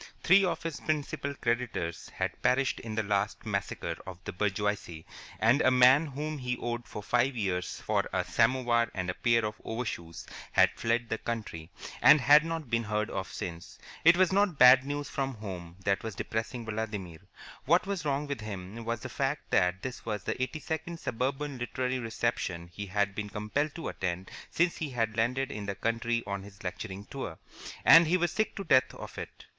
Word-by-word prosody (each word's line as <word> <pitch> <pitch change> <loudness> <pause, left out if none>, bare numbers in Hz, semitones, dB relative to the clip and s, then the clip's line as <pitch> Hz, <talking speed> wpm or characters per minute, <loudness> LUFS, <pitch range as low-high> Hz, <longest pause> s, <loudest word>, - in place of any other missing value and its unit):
Three 195 +3 +6
of 180 - -1
his 165 -3 -4
principal 145 -2 -2
creditors 115 -10 -2
had - - -4
perished 135 +1 +2
in 110 -2 -6
the 110 - +1
last 100 +2 -1
massacre 100 -2 -2
of 95 -2 -7
the - - -5
bourgeoisie, 100 -4 -2 0.3
and 120 +6 +4
a - - +5
man 130 +4 +6
whom 150 +2 -4
he 125 -1 -2
owed 120 0 -4
for 105 - -7
five 125 +4 +2
years 95 -5 -2
for - - 0
a - - 0
samovar 120 0 +2
and 90 -2 -1
a - - -6
pair 115 +2 +2
of 105 0 -5
overshoes 110 -8 -5 0.3
had - - +5
fled 115 0 0
the 110 - -1
country, 105 -9 -5 0.3
and 150 - +8
had 145 +4 +7
not 165 -3 -4
been 115 0 +1
heard 105 0 -1
of 95 -3 -4
since. 85 -1 -7 0.3
It 170 +2 +7
was 185 0 +4
not 195 -5 +2
bad 130 +1 +8
news 145 0 -3
from 135 -2 -2
home 90 -5 -7
that 100 0 +2
was 110 -2 -5
depressing 115 +3 -3
Vladimir. 105 -6 -4 0.5
What 170 +8 +4
was 195 -4 -3
wrong 145 0 0
with 140 -5 -4
him 105 +1 -7
was 115 0 -2
the - - -5
fact 135 +4 -2
that 90 0 +2
this 130 -1 -5
was 105 -2 -3
the - - -3
eighty 130 +5 -2
second 160 +2 -4
suburban 135 +2 -2
literary 130 +1 -2
reception 110 -7 -2
he 100 +2 -6
had 100 +1 0
been 105 +1 -4
compelled 115 +8 -2
to 165 - -4
attend 90 0 -4 0.2
since 170 +1 +1
he 155 - -3
had 115 -4 -1
landed 125 +4 0
in 105 -1 -5
the 100 - -2
country 115 +3 -1
on 100 -1 -3
his 100 0 -13
lecturing 95 +2 -5
tour, 115 -12 -6 0.5
and 165 0 +9
he 180 +3 +3
was 175 -2 +1
sick 215 - -1
to 195 - -4
death 130 -7 +3
of - - -8
it. - - -9
115 Hz, 195 wpm, -30 LUFS, 100-140 Hz, 0.5 s, and